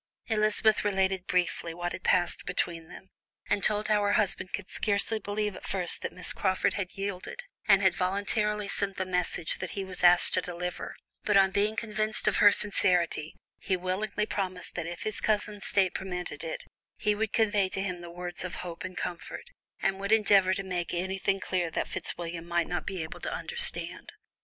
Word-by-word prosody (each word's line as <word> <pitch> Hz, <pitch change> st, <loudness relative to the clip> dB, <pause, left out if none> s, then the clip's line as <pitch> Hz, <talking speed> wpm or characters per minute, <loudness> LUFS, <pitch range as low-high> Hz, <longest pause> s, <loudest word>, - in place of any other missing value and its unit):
Elizabeth 215 Hz, 0 st, +3 dB
related 190 Hz, -2 st, +1 dB
briefly 170 Hz, -2 st, 0 dB
what 175 Hz, 0 st, -3 dB
had -, -, -5 dB
passed 175 Hz, -1 st, +2 dB
between 170 Hz, -2 st, -2 dB
them, 190 Hz, +3 st, -13 dB, 0.4 s
and 200 Hz, -, +1 dB
told 210 Hz, 0 st, +2 dB
how 210 Hz, -1 st, +3 dB
her 205 Hz, 0 st, +2 dB
husband 190 Hz, -2 st, 0 dB
could 205 Hz, -3 st, -4 dB
scarcely 210 Hz, +2 st, +1 dB
believe 210 Hz, 0 st, -2 dB
at -, -, -10 dB
first 185 Hz, -3 st, 0 dB
that -, -, -3 dB
Miss 180 Hz, -1 st, -3 dB
Crawford 190 Hz, -1 st, +1 dB
had 195 Hz, -3 st, -3 dB
yielded, 195 Hz, -, -4 dB, 0.2 s
and 200 Hz, -1 st, +6 dB
had 190 Hz, -2 st, +5 dB
voluntarily 205 Hz, +3 st, 0 dB
sent 195 Hz, -1 st, -2 dB
the 185 Hz, -, -1 dB
message 180 Hz, -2 st, -1 dB
that 185 Hz, -, -4 dB
he 195 Hz, -, -1 dB
was 185 Hz, -1 st, -3 dB
asked 175 Hz, 0 st, +7 dB
to -, -, +3 dB
deliver, 180 Hz, 0 st, -5 dB, 0.3 s
but -, -, +4 dB
on 190 Hz, -1 st, +5 dB
being 205 Hz, +2 st, +1 dB
convinced 215 Hz, -1 st, -1 dB
of -, -, +3 dB
her 205 Hz, -2 st, +8 dB
sincerity, 180 Hz, -6 st, +2 dB, 0.2 s
he 185 Hz, -, 0 dB
willingly 185 Hz, +4 st, -1 dB
promised 185 Hz, -4 st, -3 dB
that 165 Hz, -2 st, -3 dB
if 175 Hz, 0 st, -5 dB
his 215 Hz, -1 st, -2 dB
cousin's 210 Hz, -1 st, 0 dB
state 190 Hz, -2 st, +3 dB
permitted 180 Hz, -5 st, -5 dB
it, 165 Hz, -, -4 dB, 0.3 s
he 210 Hz, -1 st, +2 dB
would 220 Hz, +1 st, -1 dB
convey 205 Hz, -4 st, +2 dB
to 190 Hz, -, -2 dB
him 180 Hz, -3 st, -3 dB
the 175 Hz, -, -8 dB
words 175 Hz, 0 st, -6 dB
of 185 Hz, -, -5 dB
hope 170 Hz, -1 st, -6 dB
and 185 Hz, 0 st, -6 dB
comfort, 180 Hz, -, -5 dB, 0.3 s
and 195 Hz, 0 st, +1 dB
would 200 Hz, +1 st, -2 dB
endeavour 200 Hz, -4 st, +5 dB
to 195 Hz, -, -3 dB
make 180 Hz, -2 st, -3 dB
anything 190 Hz, +2 st, 0 dB
clear 180 Hz, -3 st, -1 dB
that -, -, -2 dB
Fitzwilliam 170 Hz, -1 st, -4 dB
might 170 Hz, -1 st, +1 dB
not 175 Hz, -, -3 dB
be 185 Hz, -4 st, -2 dB
able 160 Hz, -, -8 dB
to -, -, -4 dB
understand. 475 Hz, 0 st, -2 dB
190 Hz, 190 wpm, -29 LUFS, 180-205 Hz, 0.4 s, her